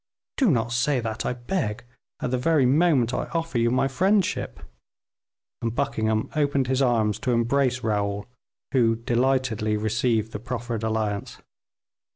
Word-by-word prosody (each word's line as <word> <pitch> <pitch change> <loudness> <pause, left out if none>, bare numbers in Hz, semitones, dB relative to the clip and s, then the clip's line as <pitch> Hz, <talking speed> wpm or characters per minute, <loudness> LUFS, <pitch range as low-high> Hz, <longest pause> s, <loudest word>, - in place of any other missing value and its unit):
"Do 260 -6 +3
not 115 -6 +1
say 125 +3 +1
that, 110 -2 -3
I - - 0
beg, 120 - -3 0.4
at 125 - -2
the 130 - +1
very 150 0 +3
moment 135 -3 +3
I - - -1
offer 165 -6 -1
you 115 0 +3
my 130 +2 +2
friendship;" 190 +7 0 1.0
and 115 0 -2
Buckingham 110 -6 0
opened 145 -3 +1
his 130 +1 0
arms 110 -5 +2
to 130 -3 -1
embrace 125 +2 +1
Raoul, 100 -2 -1 0.5
who 115 -4 +3
delightedly 120 -2 0
received 110 +1 0
the 105 - -5
proffered 120 -1 -4
alliance. 110 -2 -2
120 Hz, 145 wpm, -25 LUFS, 110-135 Hz, 1.0 s, Do